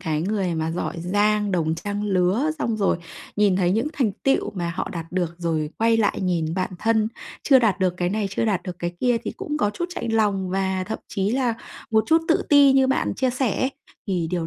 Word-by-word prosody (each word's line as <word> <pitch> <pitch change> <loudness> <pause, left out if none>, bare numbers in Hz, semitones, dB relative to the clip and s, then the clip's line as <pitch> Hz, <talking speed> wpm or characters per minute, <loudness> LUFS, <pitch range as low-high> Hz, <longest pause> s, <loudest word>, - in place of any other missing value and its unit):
cái 155 -4 -1
người 190 -2 -1
mà 160 0 -1
giỏi 175 - -3
giang, 205 +3 +1
đồng 160 -2 +1
trang 205 +4 -4
lứa, 195 +8 +1
xong 230 -5 -1
rồi 195 -4 +1 0.4
nhìn 205 -3 +3
thấy 180 -2 +2
những 230 +9 0
thành 245 -10 0
tựu 270 - +1
mà 175 -3 -3
họ - - -2
đạt 165 -2 -5
được 175 -2 -1
rồi 160 -3 -1
quay 225 0 +3
lại 215 -2 +1
nhìn 170 -3 0
bạn 185 0 -1
thân, 220 -1 +2 0.3
chưa 270 -2 +6
đạt 210 -6 +2
được 180 -1 +2
cái 175 -1 0
này, 210 +1 -1
chưa 215 - -1
đạt 195 -5 0
được 180 -1 -6
cái 175 0 -3
kia 245 -2 +3
thì - - -3
cũng 300 - -3
có 205 - +2
chút 345 - -4
chạnh 230 -9 -4
lòng, 200 -4 +1
và 190 0 -1
thậm 220 - -4
chí 195 +1 -1
là 250 -2 +1 0.4
một 220 -1 +3
chút 325 0 +4
tự 330 - +3
ti 285 -2 +7
như 265 -1 +4
bạn 265 - 0
chia 260 -1 +1
sẻ 250 -4 -1
ấy. 260 - +1 0.4
Thì 180 -4 -1
điều 170 -2 -1
200 Hz, 230 wpm, -23 LUFS, 180-225 Hz, 0.4 s, ti